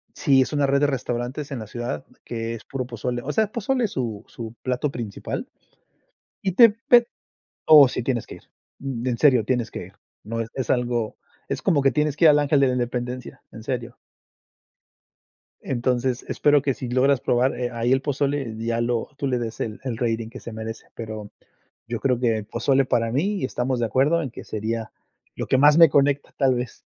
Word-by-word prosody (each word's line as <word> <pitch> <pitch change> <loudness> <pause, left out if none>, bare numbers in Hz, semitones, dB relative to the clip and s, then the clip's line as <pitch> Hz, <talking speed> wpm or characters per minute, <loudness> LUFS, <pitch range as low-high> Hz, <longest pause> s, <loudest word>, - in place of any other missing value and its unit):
Sí, 135 -3 +4
es 130 - -1
una 145 -1 +2
red 140 +1 +3
de 145 - +4
restaurantes 130 +2 -3
en 135 - -3
la 110 - -7
ciudad 120 -9 -5 0.2
que 115 -1 -4
es 110 - -10
puro 130 -2 -4
pozole, 120 0 -4
o 145 - -4
sea, 215 +4 +1
pozole 240 +2 0
es 210 - -4
su 115 -6 -3
su 115 -1 -8
plato 130 +3 -1
principal 115 -6 -5 0.9
y 190 - -1
te 230 +5 +8
pe 235 +2 +4 0.6
oh 150 -4 +9
sí, 125 - -3
tienes 120 -1 -1
que - - -9
ir, - - -17 0.4
mm, 130 -3 -4
en 120 -2 0
serio 130 -7 +5
tienes 120 -1 -1
que 90 - -7
ir. 95 - -16 0.3
No 115 +2 -4
es 115 - -3
es 130 -4 -3
algo 120 -3 0 0.3
es - - -3
como 145 -3 +2
que 135 - +3
tienes 150 -1 0
que 165 - +2
ir 160 - +9
al 150 - +5
Ángel 145 -1 +2
de 135 - +5
la - - +1
Independencia, 125 0 -4
en 110 - -10
serio. 120 -1 -4 1.7
Entonces, 125 0 -1
espero 145 -1 +3
que 140 -1 0
si 125 - -6
logras 130 +2 +3
probar, 125 +2 +1
eh, 125 -1 -2
ahí 120 +1 -1
el 130 0 +3
pozole 140 -4 -1
ya 115 +1 -1
lo 120 -1 -1
tú 145 - -2
le 125 -2 0
des 115 -1 -5
el 110 -1 -4
el 125 -4 -3
rating 115 -1 -1
que - - -10
se 115 - -9
merece. 110 0 -7
Pero 110 -2 -7 0.6
yo 120 -1 -2
creo 125 -3 +1
que 115 -3 +2
el 105 - -6
pozole, 135 +5 +1
para 115 -2 0
mí, 180 - 0
y - - -2
estamos 125 0 -1
de 115 - +1
acuerdo, 140 +9 +2
en 135 - -4
que - - -10
sería 110 +1 -4 0.4
lo - - -4
que - - +3
más 145 +3 +6
me 165 -1 +9
conecta, 140 0 +2
tal 135 -2 +3
vez. 120 -1 -5
125 Hz, 210 wpm, -23 LUFS, 115-140 Hz, 1.7 s, oh